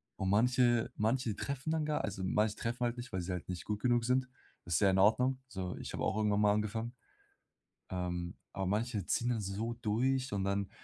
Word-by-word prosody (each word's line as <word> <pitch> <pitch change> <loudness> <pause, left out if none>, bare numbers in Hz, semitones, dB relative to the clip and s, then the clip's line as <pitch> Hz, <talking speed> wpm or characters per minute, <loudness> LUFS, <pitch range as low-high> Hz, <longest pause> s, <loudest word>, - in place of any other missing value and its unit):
Und 95 - -1
manche 120 +2 +3
manche 110 0 +1
treffen 140 +5 -3
dann 160 -2 +1
gar 150 -1 0
also, 95 -2 -3
manche 105 +2 +2
treffen 120 +1 -2
halt 120 0 -1
nicht, 120 +1 -7
weil 95 - -1
sie 90 +2 -4
halt 90 0 -5
nicht 90 -2 -4
gut 105 0 -3
genug 120 -2 +3
sind. 125 +1 +2 0.4
Das 85 -2 0
ist - - +4
ja 100 - +6
in 95 - +2
Ordnung. 125 +6 +4
Also, 95 -6 -4
ich - - -6
habe - - -3
auch 105 - +1
irgendwann 105 -1 +2
mal 105 -1 +5
angefangen. 110 +3 -2 1.0
Ähm, 90 -1 -3 0.2
aber 95 -1 -2
manche 105 0 0
ziehen 120 - +1
dann 115 -2 0
so 105 +4 -3
durch 125 +3 0
und 100 -2 0
dann 100 0 0
110 Hz, 215 wpm, -33 LUFS, 95-125 Hz, 1.0 s, ja